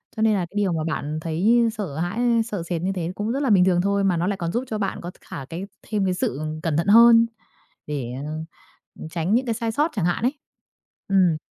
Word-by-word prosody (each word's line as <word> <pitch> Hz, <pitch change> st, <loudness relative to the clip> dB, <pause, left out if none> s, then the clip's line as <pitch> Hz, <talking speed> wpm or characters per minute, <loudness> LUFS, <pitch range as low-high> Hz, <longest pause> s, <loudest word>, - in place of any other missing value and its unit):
cho 220 Hz, -, -3 dB
nên 220 Hz, 0 st, +4 dB
là 200 Hz, -, +1 dB
cái -, -, -20 dB
điều 200 Hz, -3 st, +2 dB
mà 160 Hz, -1 st, -1 dB
bạn 155 Hz, -1 st, -3 dB
thấy 205 Hz, +9 st, +2 dB
sợ 195 Hz, -10 st, -5 dB
hãi, 175 Hz, +7 st, -2 dB
ơ, 240 Hz, -1 st, +3 dB
sợ 205 Hz, -7 st, -4 dB
sệt 170 Hz, -1 st, -3 dB
như 185 Hz, +2 st, 0 dB
thế 175 Hz, -1 st, -2 dB
cũng 210 Hz, +2 st, -2 dB
rất 270 Hz, -, -1 dB
là 270 Hz, -, +1 dB
bình 190 Hz, -4 st, +5 dB
thường 180 Hz, -2 st, +3 dB
thôi, 200 Hz, +1 st, +1 dB
mà 185 Hz, -3 st, +2 dB
nó 170 Hz, +2 st, 0 dB
lại 200 Hz, 0 st, -1 dB
còn 170 Hz, -2 st, -3 dB
giúp 240 Hz, +6 st, -1 dB
cho 220 Hz, -, -3 dB
bạn 200 Hz, -2 st, -3 dB
có 175 Hz, -, -6 dB
t -, -, -36 dB
khả 135 Hz, -, -8 dB
cái 170 Hz, +7 st, -6 dB, 0.2 s
thêm 210 Hz, -3 st, 0 dB
cái 185 Hz, -, +1 dB
sự 145 Hz, -6 st, -2 dB, 0.2 s
cẩn 160 Hz, -3 st, 0 dB
thận 170 Hz, -, 0 dB
hơn 230 Hz, +2 st, +8 dB, 0.6 s
để, 135 Hz, -5 st, -4 dB
ờ, 150 Hz, -, -5 dB, 0.7 s
ừm, -, -, -7 dB
tránh 170 Hz, +4 st, -1 dB
những 255 Hz, +2 st, +1 dB
cái 235 Hz, -, 0 dB
sai 230 Hz, 0 st, -2 dB
sót 300 Hz, +8 st, +1 dB
chẳng 195 Hz, -6 st, 0 dB
hạn 175 Hz, +5 st, 0 dB
ấy. 280 Hz, +4 st, -1 dB, 0.7 s
Ừm. 185 Hz, -5 st, +3 dB
190 Hz, 260 wpm, -23 LUFS, 165-220 Hz, 0.7 s, hơn